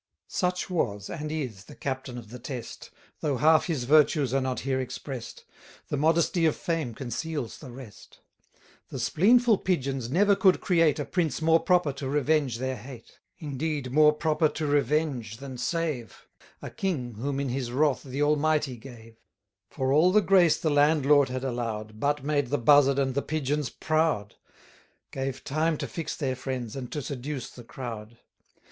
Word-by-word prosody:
Such 180 0 -1
was, 105 - -2
and 150 -2 -5
is, 125 -11 -4
the - - -13
Captain 130 -2 -4
of 115 -3 -10
the 125 - -8
Test, 125 -1 -7 0.3
Though 145 -4 -1
half 155 +5 +4
his 155 -8 -1
virtues 145 -1 +3
are 135 - +2
not 130 -1 -2
here 130 0 -1
express'd; 130 -1 -7 0.5
The - - -1
modesty 165 +2 +2
of 155 - +1
fame 160 -9 -3
conceals 140 +1 -4
the 140 - -10
rest. 120 -4 -12 0.7
The - - -6
spleenful 230 +4 +4
Pigeons 135 -9 -1
never 200 +7 +4
could 190 -2 +4
create 165 -5 +3
A 145 - -3
prince 165 -8 -1
more 165 +1 +4
proper 180 -6 +2
to 135 0 -5
revenge 145 -3 +1
their 130 +1 -3
hate: 120 +1 -12 0.2
Indeed, 145 -2 -3
more 150 +2 +6
proper 155 0 +1
to 155 +1 -4
revenge, 145 -6 0
than 130 -1 -8
save; 150 - -3 0.4
A - - -6
king, 140 -11 -3
whom 135 +4 -2
in 140 -1 -2
his 125 -1 -3
wrath 145 +2 +2
the 135 +2 -3
Almighty 150 -3 +1
gave: 115 -2 -13 0.5
For 135 -1 -1
all 165 +5 +5
the 210 +2 +5
grace 185 -4 +4
the 155 - 0
landlord 145 -1 +4
had 130 +1 -4
allow'd, 115 -4 -3
1200 110 - -16
But 145 +1 0
made 145 -2 0
the 145 +4 0
Buzzard 140 +2 +5
and 135 -2 +1
the 140 - 0
Pigeons 150 -2 -2
proud; 155 -10 0 0.8
Gave 135 0 -4
time 155 +2 0
to - - -4
fix 165 -3 -5
their 135 -4 -2
friends, 125 -4 -5
and 130 -3 -6
to 150 - -4
seduce 135 0 -5
the 120 - -12
crowd. 115 -3 -8
140 Hz, 170 wpm, -27 LUFS, 125-155 Hz, 0.8 s, more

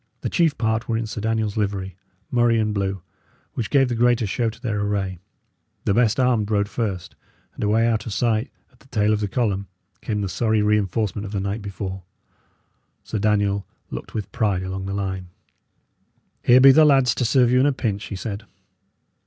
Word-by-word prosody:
The - - -3
chief 165 -5 +2
part 110 0 -1
were 115 - +1
in 115 - -2
Sir 105 0 -5
Daniel's 110 -1 -1
livery, 100 -3 -2 0.4
murrey 120 -1 +3
and 110 -1 0
blue, 95 -3 -2 0.5
which 115 - -3
gave 135 -2 +4
the 120 - -2
greater 120 0 +2
show 115 +3 0
to 110 - -11
their 110 -4 -2
array. 100 -3 -2 0.7
The 100 - +2
best 115 +1 +2
armed 120 -5 +2
rode 100 -2 +1
first; 100 -5 -3 0.4
and - - -6
away 110 +2 +3
out 110 -2 0
of - - -4
sight, 115 +3 0 0.2
at 125 - -28
the - - -22
tail 105 -5 +1
of 105 - 0
the 105 - -1
column, 100 -3 -1 0.3
came 105 -2 -2
the 100 - -1
sorry 110 +3 +1
reinforcement 105 0 0
of 100 - -7
the 100 - -1
night 100 +3 -3
before. 95 -1 -5 1.0
Sir 110 - -4
Daniel 100 -1 +1 0.2
looked - - -7
with 105 -3 -4
pride 105 -6 0
along 95 +1 -4
the 100 - -3
line. 95 -2 -3 1.1
"Here 125 +1 +6
be 135 +1 +9
the 155 +4 +6
lads 135 -5 +5
to - - -2
serve 125 0 +3
you 125 - +4
in 135 - +4
a - - +3
pinch," 105 -6 -2
he - - -6
said. 100 +2 -5
105 Hz, 195 wpm, -23 LUFS, 100-120 Hz, 1.1 s, be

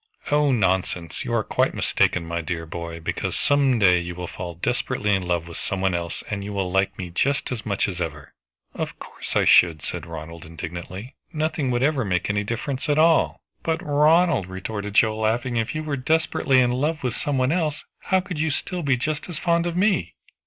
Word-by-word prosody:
"Oh, 145 -1 +4
nonsense! 95 - 0
You - - -1
are - - +2
quite - - +1
mistaken, 90 -2 +1
my 85 +1 -2
dear 80 +1 -4
boy, 85 0 -6
because 80 - -3
some 140 -3 +3
day 90 -4 +5
you 85 0 -5
will 90 0 -5
fall 90 -1 -6
desperately 105 +4 0
in 95 - +2
love 85 -2 0
with 85 - -8
some 100 - -3
one 95 -1 +1
else, 85 -1 -3
and 100 -2 -3
you 100 +1 -5
will 95 -2 -1
like 95 +1 +1
me 90 -2 -5
just 140 +12 0
as 120 -2 -4
much 100 -2 +1
as 90 -3 -4
ever" 75 -3 -5 0.4
"Of - - -4
course - - -8
I - - +4
should," 80 -4 +5
said 85 -2 -5
Ronald 80 0 -8
indignantly. 85 - -7 0.2
"Nothing 155 -4 -1
would 120 0 +1
ever 140 -2 +2
make 90 -1 0
any 105 0 0
difference 130 +7 -3
at 145 - +3
all!" 160 +1 +4 0.2
"But, 160 0 0
Ronald," 150 - +4
retorted 100 +2 -5
Joe 110 0 +4
laughing, 115 +3 0
"if 115 +7 -1
you 155 - -2
were 150 -2 -2
desperately 140 -1 +2
in 125 -1 +4
love 150 +5 -1
with 125 -3 0
some 145 +2 -2
one 130 +1 +2
else, 160 -4 0 0.2
how 190 0 +3
could 180 -4 -6
you 160 +1 +1
still 180 +5 -3
be 135 -5 +2
just 155 +6 -3
as 175 - -5
fond 170 0 +1
of 170 0 -3
me?" 190 - +1
110 Hz, 210 wpm, -24 LUFS, 90-145 Hz, 0.4 s, day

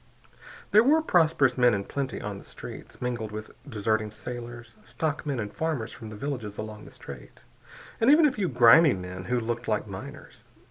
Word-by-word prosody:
There 215 +2 +7
were 310 +5 +4
prosperous 155 - +3
men 125 -3 +5
in 100 - -2
plenty 135 +4 -4
on 100 -1 -5
the - - -13
streets, - - -10
mingled 120 -3 -3
with 110 +1 -7 0.2
deserting 110 -1 0
sailors, 120 0 -8
stockmen 150 -4 -3
and 105 -2 -4
farmers 155 -9 -2
from 110 - -9
the 110 - -8
villages 115 -4 -5
along 105 0 -7
the - - -13
Strait, 70 -3 -11 0.6
and 225 - +4
even 305 +2 +7
a 295 - +4
few 200 -8 -1
grimy 125 +5 +7
men 90 0 -7
who 125 +3 0
looked 120 +1 -3
like 105 -1 0
miners. 95 -3 -10
120 Hz, 180 wpm, -27 LUFS, 105-145 Hz, 0.6 s, There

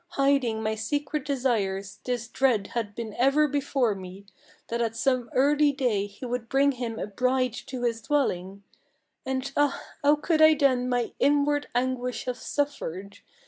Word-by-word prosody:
Hiding 275 -5 +2
my 215 0 0
secret 285 +7 -2
desires, 205 -8 -1
this 245 -2 -2
dread 240 -6 +1
had 210 -4 -3
been 225 -3 -5
ever 275 +4 +4
before 275 -5 0
me, 190 +1 -10 0.4
That 235 +1 -1
at 225 -1 -1
some 250 -1 0
early 290 +2 +4
day 240 -8 0
he 205 +5 -10
would 240 -1 -4
bring 275 +1 +3
him 240 -3 -4
a - - -3
bride 255 +3 0
to 250 -2 -5
his 230 -1 0
dwelling; 200 -8 -1 0.6
And 265 +1 -2
ah, 290 -1 +2 0.2
how 290 0 +5
could 310 +1 0
I 315 0 +8
then 260 -4 +2
my 245 -2 0
inward 290 +1 +2
anguish 250 0 -1
have 250 -1 -3
suffered! 200 - -3
250 Hz, 160 wpm, -27 LUFS, 220-280 Hz, 0.6 s, I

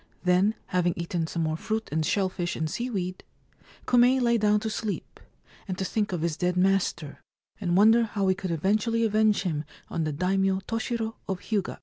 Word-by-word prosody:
Then, 185 +4 +3 0.2
having 175 -1 +2
eaten 170 -1 -2
some 165 0 -2
more 155 0 0
fruit 220 +6 -3
and 160 +1 0
shell 190 +5 +1
fish 175 -1 -3
and 160 - -1
seaweed, 185 -2 -3 0.6
Kume 250 +2 +5
lay 235 -2 +2
down 210 0 +3
to 220 - -2
sleep, 215 -1 -4 0.5
and 185 -2 -3
to 190 - -2
think 210 +1 -1
of 175 -3 -2
his 165 -2 -1
dead 180 0 0
master, 180 -6 0 0.4
and 180 -3 0
wonder 225 +3 +6
how 205 -3 -1
he 190 - +4
could 185 0 -5
eventually 215 +8 +1
avenge 215 -1 +3
him 155 -5 -2 0.3
on 165 - -2
the 155 - -1
Daimio 190 +4 +1
Toshiro 225 0 -3
of 190 -2 -2
Hyuga. 210 -4 -2
195 Hz, 190 wpm, -27 LUFS, 175-220 Hz, 0.6 s, wonder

